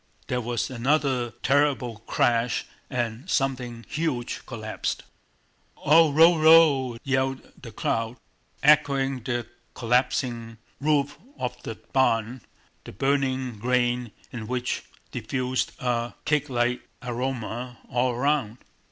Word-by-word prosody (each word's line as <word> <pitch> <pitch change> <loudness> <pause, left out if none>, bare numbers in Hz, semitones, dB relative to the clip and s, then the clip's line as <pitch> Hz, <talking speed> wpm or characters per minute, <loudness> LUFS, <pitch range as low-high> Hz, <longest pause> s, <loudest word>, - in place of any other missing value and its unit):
There 125 -1 0
was 120 +1 -2
another 130 -1 +1
terrible 135 -5 +2
crash 120 0 +1 0.2
and 120 - -3
something 125 -6 -1
huge 145 -6 -2
collapsed. 110 -4 -4 0.7
"Ou 160 +1 +5
rou 165 +3 +6
rou!" 155 -6 +6
yelled 135 -1 -1
the 115 - -9
crowd, 115 +2 -2 0.5
echoing 140 -2 +4
the - - -16
crash 120 0 -1
of - - -14
the - - -26 0.3
collapsing 120 -1 0 0.2
roof 145 -1 +1 0.2
of 125 - -4
the 115 - -6 0.2
barn, 120 -2 +2 0.4
the - - -9
burning 130 -1 0
grain 120 0 +1 0.2
in 115 -3 -6
which 125 +1 -2 0.3
diffused 125 +2 -2
a 120 -2 -1
cakelike 125 -5 +1 0.2
aroma 125 -1 -4
all 125 +1 +1
around. 125 -3 0
125 Hz, 115 wpm, -26 LUFS, 120-135 Hz, 0.7 s, rou